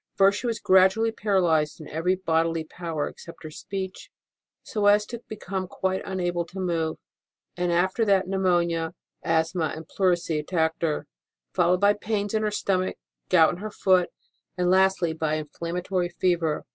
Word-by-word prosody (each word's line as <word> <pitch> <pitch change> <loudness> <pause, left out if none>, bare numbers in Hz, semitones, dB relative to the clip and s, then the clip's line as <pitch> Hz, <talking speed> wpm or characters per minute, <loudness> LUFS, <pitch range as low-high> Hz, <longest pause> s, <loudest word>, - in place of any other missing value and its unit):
First, 200 +1 +4
she 245 - -3
was 230 -2 -1
gradually 190 +4 +4
para 205 -3 +1
lyzed 160 -4 +1
in 155 - -9
every 165 +4 0
bodily 165 -2 0
power 160 -2 -4
except 170 - -11
her 155 - -7
speech, 190 +3 -6 0.5
so 210 -2 0
as 205 +1 +5
to 235 +1 -7
become 190 -3 -4
quite 190 +1 -2
unable 175 -2 -1
to 190 +3 -9
move; 165 -3 -1 0.6
and 175 0 0
after 185 +6 +2
that 195 -2 +3
pneumonia, 175 -3 +1 0.3
asthma, 160 0 0
and 160 0 -9
pleurisy 175 -4 +1
attacked 160 +1 -1
her, 155 -3 -1 0.5
followed 180 0 +2
by 205 0 +5
pains 205 -1 -2
in 220 - +1
her 215 - +1
stomach, 190 -3 -1 0.3
gout 165 -3 +6
in 175 - -6
her 215 +3 -5
foot, 185 -3 +2 0.5
and 180 0 +2
lastly 190 -3 +3
by 155 -1 -1
inflammatory 175 +4 -3
fever. 175 -3 0
180 Hz, 160 wpm, -25 LUFS, 165-195 Hz, 0.6 s, gout